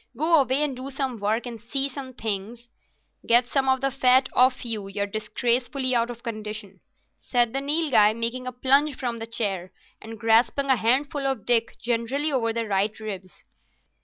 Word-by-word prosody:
Go 320 +2 +4
away 270 +2 +1
and 285 -3 -2
do 260 +2 -6
some 265 -4 -3
work, 215 +4 -1
and 235 -3 -8
see 270 +4 +1
some 265 -2 -9
things." 220 +2 -4 0.6
"Get 240 +1 +5
some 265 +1 0
of 265 0 +2
the 275 0 0
fat 260 0 +3
off 255 0 +3
you; 215 -4 -2
you're 200 +1 -2
disgracefully 245 +5 0
out 235 0 +1
of 235 -1 -9
condition," 215 -4 -6 0.4
said 240 -2 0
the 270 - -1
Nilghai, 280 -8 +3
making 235 +2 -2
a - - -3
plunge 275 +3 +3
from 240 -3 -4
the 225 - -6
chair 195 -6 -3 0.3
and 225 0 -9
grasping 230 +5 +2
a - - +5
handful 275 +5 +1
of 265 -7 -3
Dick 230 -2 +2
generally 245 +6 -1
over 235 -4 0
the 230 0 -2
right 205 +1 -1
ribs. 195 -4 -8
240 Hz, 180 wpm, -24 LUFS, 220-265 Hz, 0.6 s, Get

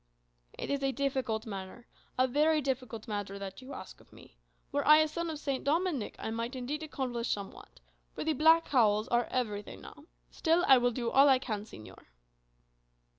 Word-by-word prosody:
"It - - -5
is 280 -1 -1
a 270 0 +1
difficult 260 -4 -2
matter, 195 +2 -8 0.3
a 255 0 +3
very 305 +4 +3
difficult 255 -5 -4
matter 205 -2 -4
that 195 +2 -7
you 260 +2 -11
ask 260 -8 -9
of - - -24
me. - - -17 0.4
Were - - 0
I 305 0 +8
a 310 0 +4
son 335 +2 -4
of 315 - -4
St. 275 -3 -3
Dominic, 305 - 0
I 220 - -5
might 230 +3 -4
indeed 265 +5 -4
accomplish 255 -6 -3
somewhat. 195 - -6 0.4
For - - -4
the 315 0 +1
black 320 +3 +5
cowls 215 -5 +2
are 240 0 +2
everything 210 -5 -3
now. 295 - -13 0.3
Still, 335 +2 +2
I 265 -2 +8
will 245 0 +2
do 235 -1 -3
all 275 +1 +6
I 265 - +6
can, 215 -5 -4
señor." 110 - -13
255 Hz, 185 wpm, -31 LUFS, 220-295 Hz, 0.4 s, I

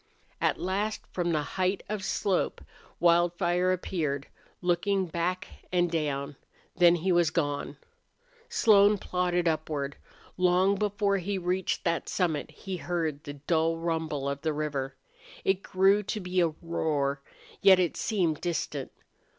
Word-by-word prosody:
At - - +1
last 205 +4 -2
from 175 -1 -1
the 155 -2 +1
height 185 +5 -1
of 210 -1 -3
slope 195 -1 0 0.4
Wildfire 175 +1 +3
appeared, 155 -6 -2 0.3
looking 185 +2 +1
back 175 +2 -2 0.2
and 175 -2 +2
down. 145 -3 -2 0.4
Then 175 -1 +6
he 180 +3 0
was 175 -2 +4
gone. 145 -4 -2 0.7
Slone 210 -1 +5
plodded 180 -2 0
upward. 155 -3 -2 0.4
Long 185 +2 +4
before 200 0 +1
he 195 +2 -2
reached 180 0 -1
that 170 -1 -1
summit 165 -6 0
he 185 +5 -6
heard 160 -4 -2
the 145 - -5
dull 160 +3 0
rumble 160 -4 -2
of 140 0 -3
the 155 0 0
river. 140 -3 -3 0.5
It 190 0 +2
grew 195 +2 +3
to 210 +1 -3
be 180 -1 0
a 170 - +4
roar, 155 -4 -2 0.4
yet 195 -1 +8
it 180 -3 +1
seemed 175 -8 0
distant. 170 -4 -3
175 Hz, 135 wpm, -28 LUFS, 155-185 Hz, 0.7 s, yet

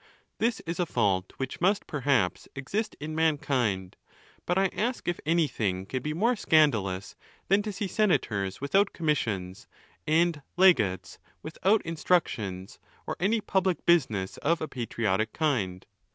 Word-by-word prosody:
This 230 0 0
is 170 +2 -5
a 175 - +1
fault 95 -7 0
which 135 +3 -5
must, 195 +3 +2
perhaps, 135 -10 0
exist 205 +11 -3
in 155 +1 -5
mankind; 130 - 0 0.5
but 180 - +1
I 195 0 +3
ask 240 +3 -2
if 175 - -1
anything 115 - 0
can 130 +6 -3
be 150 - -3
more 230 +8 +2
scandalous 110 - +2 0.3
than 195 +2 +4
to 210 0 -4
see 200 +1 -3
senators 110 - 0
without 195 +9 +2
commissions, 105 - -2 0.4
and 160 0 +2 0.2
legates 105 - +3 0.2
without 190 +7 +1
instructions, 115 - -1 0.3
or - - -3
any 210 +5 +1
public 190 -4 0
business 115 - +2
of 165 +3 +1
a 155 - -3
patriotic 110 -4 -1
kind? 105 - -1
150 Hz, 140 wpm, -28 LUFS, -, 0.5 s, than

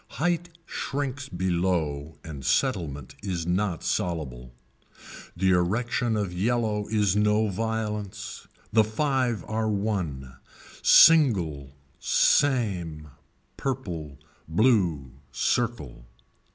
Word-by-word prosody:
Height 175 +4 0 0.2
shrinks 140 -1 -4
below 85 -5 -1
and 75 -4 -8
settlement 75 - -1
is 90 -5 -3
not 90 -1 -1
soluble. 65 -8 -3 0.9
The 95 +1 +2
erection 110 +6 +1
of 100 -4 -2
yellow 105 +1 0
is 105 -3 +1
no 105 +1 +2
violence. 105 0 -4 0.3
The 110 0 +6
five 120 - -1
are 110 0 -1
won. 90 -12 -3 0.4
Single, 85 - +5 0.2
same, 90 - +1 0.5
purple, 85 - -4 0.3
blue, 85 - +2 0.2
circle. 75 - -2
100 Hz, 85 wpm, -26 LUFS, 80-115 Hz, 0.9 s, The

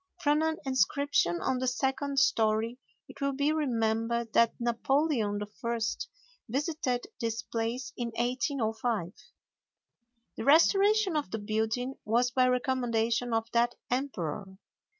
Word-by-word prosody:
From 295 0 +3
an 320 0 0
inscription 265 - +1
on 255 - 0
the 255 - -1
second 270 +2 -1
story 225 0 +2 0.3
it 280 - -14
will 280 0 +1
be 285 +2 +1
remembered 230 -5 0
that 230 -1 +4
Napoleon 235 -2 +1
I. 230 +3 -4 0.7
visited 275 -1 -1
this 230 0 -2
place 240 +5 -3
in 240 - -3
1805. 235 - -1 1.2
The - - -3
restoration 390 +6 +4
of 300 -2 -1
the 225 - -3
building 220 +5 -2
was 240 +3 +2
by 255 0 +3
recommendation 245 -2 0
of 225 0 +1
that 240 +1 +2 0.2
emperor. 195 - -3
245 Hz, 120 wpm, -29 LUFS, 225-275 Hz, 1.2 s, that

